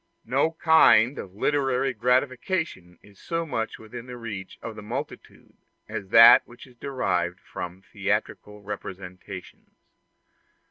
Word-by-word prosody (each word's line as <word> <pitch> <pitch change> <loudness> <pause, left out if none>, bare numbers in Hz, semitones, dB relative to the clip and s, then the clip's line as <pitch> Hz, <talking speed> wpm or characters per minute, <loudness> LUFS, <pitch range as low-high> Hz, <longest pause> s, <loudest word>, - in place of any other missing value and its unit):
No 140 +7 +1
kind 160 -7 +5
of 95 0 -9
literary 135 +1 0
gratification 125 - -1
is 100 -1 -19
so 165 0 -3
much 115 -7 -3
within 115 +2 -10
the 125 0 -8
reach 105 -5 -7
of 115 -2 -7
the 105 - -9
multitude 125 +8 -7 0.3
as 100 - -6
that 115 +4 +9
which 120 - -14
is 130 - -18
derived 90 -10 -2
from 90 +2 -8
theatrical 105 0 -3
representations. 95 -2 -9
115 Hz, 125 wpm, -25 LUFS, 100-130 Hz, 0.3 s, that